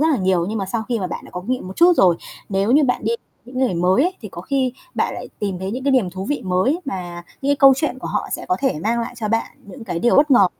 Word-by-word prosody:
rất 315 Hz, -, +4 dB
là 285 Hz, -, +3 dB
nhiều. 185 Hz, -3 st, +1 dB
Nhưng 220 Hz, 0 st, -2 dB
mà 195 Hz, -, -2 dB
sau 220 Hz, +3 st, -2 dB
khi 235 Hz, -2 st, 0 dB
mà 185 Hz, -, -2 dB
bạn -, -, -6 dB
đã -, -, -13 dB
có 180 Hz, -, -5 dB
kinh 200 Hz, -, -7 dB
nghiệm 255 Hz, -6 st, -1 dB
một 190 Hz, -, -9 dB
chút 355 Hz, +1 st, +6 dB
rồi, 180 Hz, -3 st, +5 dB, 0.3 s
nếu 195 Hz, +2 st, 0 dB
như 290 Hz, +4 st, +5 dB
bạn 250 Hz, -4 st, 0 dB
đi 230 Hz, -, +1 dB, 0.3 s
những 255 Hz, +1 st, -7 dB
người 255 Hz, -9 st, +1 dB
mới 180 Hz, +8 st, +3 dB
ấy 365 Hz, +3 st, 0 dB
thì 210 Hz, -, -6 dB
có 175 Hz, -, -8 dB
khi 260 Hz, +3 st, 0 dB, 0.2 s
bạn -, -, 0 dB
lại -, -, -7 dB
tìm 200 Hz, -4 st, -2 dB
thấy 190 Hz, +1 st, -4 dB
những 255 Hz, +4 st, -4 dB
cái 280 Hz, -, +3 dB
niềm 220 Hz, -9 st, +2 dB
thú 190 Hz, +1 st, -6 dB
vị 290 Hz, +4 st, -2 dB
mới 190 Hz, -, +1 dB
mà 175 Hz, -9 st, -5 dB, 0.2 s
những 280 Hz, -, +1 dB
cái 285 Hz, -, +3 dB
câu 275 Hz, 0 st, +8 dB
chuyện 305 Hz, -, -1 dB
của -, -, -6 dB
họ -, -, -2 dB
sẽ -, -, -4 dB
có 365 Hz, -, +2 dB
thể 270 Hz, -, +1 dB
mang 230 Hz, +3 st, +1 dB
lại 230 Hz, -, -5 dB
cho 215 Hz, -2 st, -2 dB
bạn 225 Hz, +1 st, +1 dB, 0.2 s
những 225 Hz, +4 st, -10 dB
cái 175 Hz, -5 st, -3 dB
điều 240 Hz, +7 st, +3 dB
bất 295 Hz, +1 st, +5 dB
ngờ. 220 Hz, -7 st, +7 dB
225 Hz, 315 wpm, -21 LUFS, 190-270 Hz, 0.3 s, câu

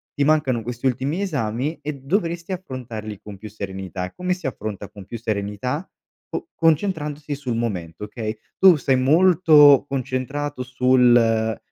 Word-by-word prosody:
Ti 140 Hz, -, +1 dB
mancano 140 Hz, -6 st, +2 dB
questi 120 Hz, +2 st, -3 dB
ultimi 135 Hz, +8 st, -1 dB
esami 140 Hz, -, -2 dB
e 150 Hz, -, -4 dB
dovresti 170 Hz, +5 st, -2 dB
affrontarli 120 Hz, -, -6 dB
con 105 Hz, -2 st, -10 dB
più 110 Hz, -, -9 dB
serenità. 95 Hz, -3 st, -6 dB
Come 180 Hz, 0 st, -2 dB
si 180 Hz, -5 st, -5 dB
affronta 105 Hz, -4 st, -5 dB
con 100 Hz, -2 st, -12 dB
più 115 Hz, -, -6 dB
serenità? 110 Hz, -, -3 dB, 0.4 s
Co 335 Hz, -, -6 dB
concentrandosi 155 Hz, -3 st, 0 dB
sul 130 Hz, -4 st, -4 dB
momento, 95 Hz, -7 st, -4 dB
okay, 110 Hz, 0 st, -5 dB, 0.2 s
tu 190 Hz, -2 st, +8 dB
sei 135 Hz, -2 st, +1 dB
molto 150 Hz, -1 st, +6 dB
concentrato 135 Hz, +1 st, -3 dB
sul, 125 Hz, -1 st, +4 dB
ehm: 110 Hz, -1 st, +2 dB
130 Hz, 145 wpm, -22 LUFS, 110-150 Hz, 0.4 s, tu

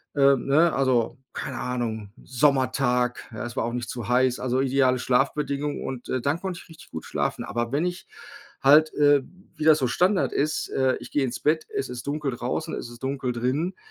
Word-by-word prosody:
ähm, 140 Hz, -2 st, +4 dB
ne? 160 Hz, +4 st, +4 dB
Also, 130 Hz, -4 st, +1 dB, 0.2 s
keine -, -, -5 dB
Ahnung, 110 Hz, -5 st, -3 dB
Sommertag, 130 Hz, -2 st, +1 dB
ja, 110 Hz, -, -5 dB
es 120 Hz, -, -7 dB
war -, -, +1 dB
auch 120 Hz, -, -3 dB
nicht 120 Hz, -1 st, -4 dB
zu 120 Hz, -3 st, -5 dB
heiß. 125 Hz, 0 st, +2 dB
Also, 130 Hz, +1 st, 0 dB
ideale 130 Hz, -1 st, +2 dB
Schlafbedingung 140 Hz, +3 st, 0 dB
und 125 Hz, -2 st, -6 dB, 0.2 s
dann 145 Hz, +4 st, +1 dB
konnte 185 Hz, -2 st, -4 dB
ich -, -, -22 dB
richtig 160 Hz, -1 st, -15 dB
gut -, -, -6 dB
schlafen, -, -, -2 dB
aber 120 Hz, +1 st, -2 dB
wenn 155 Hz, +5 st, +1 dB
ich 180 Hz, +1 st, -4 dB, 0.5 s
halt, 150 Hz, +3 st, +6 dB
äh, 145 Hz, -2 st, +4 dB, 0.3 s
wie 155 Hz, -, -3 dB
das 155 Hz, -1 st, +6 dB
so 130 Hz, -, +1 dB
Standard 180 Hz, -, +2 dB
ist, 155 Hz, +2 st, -1 dB
äh, 130 Hz, -1 st, +1 dB
ich -, -, -11 dB
gehe 145 Hz, -, +1 dB
ins 125 Hz, -, -4 dB
Bett, 155 Hz, +1 st, +1 dB
es 135 Hz, -, -2 dB
ist 125 Hz, -1 st, -7 dB
dunkel 145 Hz, -1 st, -1 dB
draußen, 125 Hz, +7 st, -3 dB
es 120 Hz, -, -6 dB
ist 120 Hz, 0 st, -13 dB
dunkel 135 Hz, -2 st, -2 dB
drinnen, 140 Hz, +10 st, -1 dB
135 Hz, 200 wpm, -25 LUFS, 125-150 Hz, 0.5 s, halt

